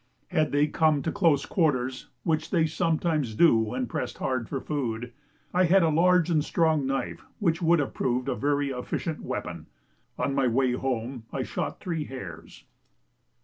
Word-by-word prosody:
Had 155 -4 +1
they 145 +1 +3
come 155 -1 +2
to 160 - -1
close 165 -8 +2
quarters 130 -7 0 0.2
(which 160 0 0
they 165 -4 +3
sometimes 160 -6 0
do 165 0 +6
when 115 +3 0
pressed 115 - -4
hard 130 -4 -2
for 135 - -2
food) 125 -5 -3 0.4
I 185 +1 +4
had 185 +2 +5
a 165 - +3
large 180 +2 +4
and 155 -3 +3
strong 160 -4 +1
knife 135 0 -3
which 170 -3 0
would 170 0 +4
have 145 -3 -1
proved 125 +1 -1
a - - +1
very 145 0 0
efficient 135 +5 -3
weapon. - - -5 0.5
On 140 - 0
my 135 -2 +2
way 125 +2 +2
home 125 -1 -3
I 135 - -2
shot - - -4
three 165 -5 -3
hares. 115 - -9
145 Hz, 170 wpm, -27 LUFS, 130-165 Hz, 0.5 s, do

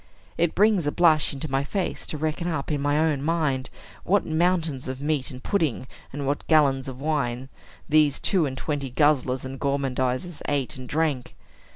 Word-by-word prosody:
It 170 -1 +1
brings 205 -5 +3
a - - +1
blush 160 -3 +4
into 140 +2 -5
my 135 +1 +1
face 185 +7 -3
to 155 - -4
reckon 155 +3 -2
up, 160 -4 -2
in 145 -2 -1
my 145 +1 +1
own 155 -3 +1
mind, 150 -4 0 0.3
what 200 +2 +2
mountains 160 -4 0
of 130 0 -5
meat 145 -2 -1
and 130 0 -9
pudding, 160 - 0 0.3
and 140 0 -4
what 140 +1 -2
gallons 140 -4 +3
of 130 -1 -7
wine, 135 -4 -1 0.4
these 150 -2 +3
two 180 -7 +2
and 130 -1 -6
twenty 145 -2 -3
guzzlers 130 -1 +2
and 130 0 -7
gormandizers 140 +3 -1
ate 140 -3 -1
and 130 -1 -8
drank. 150 -5 -1
145 Hz, 180 wpm, -25 LUFS, 135-160 Hz, 0.4 s, blush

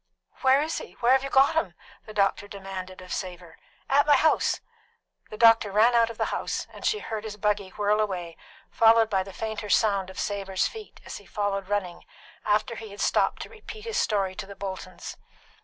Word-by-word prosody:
"Where 270 +2 +5
is 320 +1 -2
he? - - -10
Where 240 +1 +1
have 265 0 +4
you 275 - -3
got 270 +3 +5
him?" 200 - -1 0.3
the 215 - -9
doctor 200 0 +1
demanded 190 -2 -7
of 185 - -7
Savor. 175 -3 -6 0.3
"At 285 +2 +3
my 295 - +7
house." 315 +3 +2 0.7
The 215 - -8
doctor 225 -3 +6
ran 220 +4 +4
out 230 -1 +4
of 230 - -8
the - - -1
house, - - -2
and - - -11
she 430 - +2
heard 220 - -5
his 215 -1 -7
buggy 205 -2 0
whirl 210 +2 +1
away, 180 -6 -2 0.4
followed 225 0 +5
by 190 -2 +2
the 195 +1 -7
fainter 220 +1 -5
sound 200 -3 +2
of 190 - -9
Savor's 195 -2 -1
feet 440 -2 -11
as - - -7
he - - -15
followed 195 -2 -2
running, 190 -4 -2 0.4
after 215 +2 +1
he 220 -1 -8
had 200 +1 -12
stopped - - +1
to - - -11
repeat 435 -1 -11
his 455 -2 -3
story 195 -3 +1
to 195 +1 -7
the 200 - -10
Boltons. 185 -2 -7
210 Hz, 205 wpm, -26 LUFS, 195-230 Hz, 0.7 s, my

